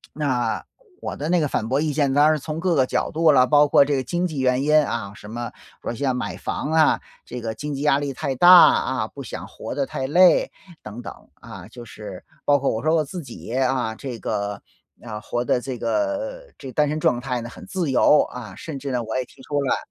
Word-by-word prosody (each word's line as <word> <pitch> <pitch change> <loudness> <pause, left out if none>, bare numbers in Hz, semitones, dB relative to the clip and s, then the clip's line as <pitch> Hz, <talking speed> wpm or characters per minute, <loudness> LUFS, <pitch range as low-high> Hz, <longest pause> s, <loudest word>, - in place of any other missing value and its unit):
那， 130 -6 -1 0.4
我 - - -4
的 150 +3 -4
那 180 0 +3
个 150 - +1
反 110 - -2
驳 135 +2 +1
意 155 -1 0
见， 140 -2 +1
当 145 +2 +5
然 155 - 0
从 155 +3 -5
各 180 +1 +1
个 135 -3 +4
角 - - -1
度 160 0 +4
了， 130 -3 +5
包 145 +1 +5
括 140 - +5
这 145 0 0
个 130 - -1
经 175 +7 -1
济 155 -5 -5
原 130 0 +2
因 150 +1 +4
啊， 105 -4 -4
什 105 - -12
么 120 +1 -5 0.3
比 - - -5
如 - - -2
像 130 0 -1
买 125 - -4
房 150 - -4
啊， 160 -1 +4 0.3
这 125 - -7
个 110 -1 -3
经 145 +6 -5
济 135 - -5
压 145 -1 +3
力 140 -1 -3
太 135 +1 -3
大 175 +8 +6
啊， 130 -9 +6
不 140 - -10
想 120 - -7
活 - - -7
得 140 -1 0
太 130 0 -4
累 180 +5 +5 0.3
等 105 +3 -8
等， - - -7 0.2
啊， - - -11
就 120 - -11
是， 105 -4 -10 0.2
包 145 - +5
括 140 - 0
我 110 - -3
说 155 +1 +3
我 160 - +2
自 175 +5 -7
己， 120 -4 -9
啊， 130 -3 0
这 125 0 -6
个， 100 -1 -3 0.4
啊， 110 -3 -6
活 120 +3 -3
得 125 - +1
这 130 0 -5
个 - - -2
这 135 - -10
个 - - -10
单 150 -1 +2
身 155 +1 -2
状 120 - +2
态 125 -1 -3
呢， 120 - -7
很 - - -12
自 175 -7 -2
由 150 +3 +5
啊， 125 -3 -9
甚 150 -4 -7
至 140 +1 -5
呢， 125 -2 -1
我 110 0 -5
也 130 - 0
提 - - -19
出 145 +1 -1
了 135 - +1
135 Hz, 265 characters per minute, -23 LUFS, 120-150 Hz, 0.4 s, 大